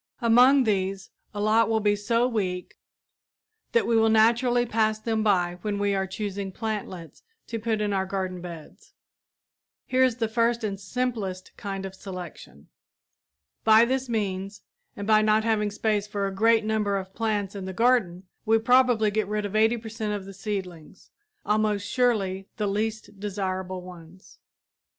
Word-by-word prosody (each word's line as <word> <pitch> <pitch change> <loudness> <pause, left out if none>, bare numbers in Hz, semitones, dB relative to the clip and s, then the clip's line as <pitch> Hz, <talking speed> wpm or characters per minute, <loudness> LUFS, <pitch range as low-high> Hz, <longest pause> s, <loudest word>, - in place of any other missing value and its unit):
Among 250 +3 +5
these 195 -3 -1 0.2
a 205 - -6
lot 215 +2 +3
will 220 -1 +2
be 205 -1 +2
so 230 +4 +1
weak 185 -7 -3 0.9
that 470 - +2
we 235 - +1
will 225 0 +4
naturally 240 +2 +3
pass 220 -1 +1
them 220 0 -1
by 180 -4 +1
when 205 0 -2
we 200 0 +1
are 190 -1 -1
choosing 200 0 -4
plantlets 200 -6 -5 0.2
to 230 - -5
put 220 -1 -1
in 205 -1 0
our 190 -1 0
garden 185 -2 -3
beds. 170 -3 -11 0.9
Here 260 0 +2
is 255 -3 +2
the 230 -2 -1
first 230 +1 +1
and 200 -2 -3
simplest 200 -4 -4
kind 195 -1 -5
of 190 - -7
selection. 180 - -10 1.0
By 220 +1 +6
this 260 +1 -2
means, 200 -3 -3 0.3
and 200 - -5
by 215 0 +5
not 215 0 +3
having 215 -2 +1
space 210 0 -1
for 205 -1 -2
a 195 - -3
great 225 +2 +3
number 210 -2 0
of 190 0 -7
plants 210 -4 -1
in 195 -2 -6
the 190 - -4
garden, 205 -5 +2 0.2
we 225 0 +3
probably 240 -2 +3
get 215 0 -1
rid 210 0 -2
of 205 +1 -5
80 220 +2 +3
per 220 0 -8
cent 215 -1 -3
of 200 -2 -5
the 195 - -9
seedlings 190 -4 -7 0.3
almost 210 -1 +1
surely 195 -7 0
the 210 - -1
least 210 0 -3
desirable 190 -2 -3
ones. 180 0 -14
210 Hz, 165 wpm, -26 LUFS, 190-225 Hz, 1.0 s, By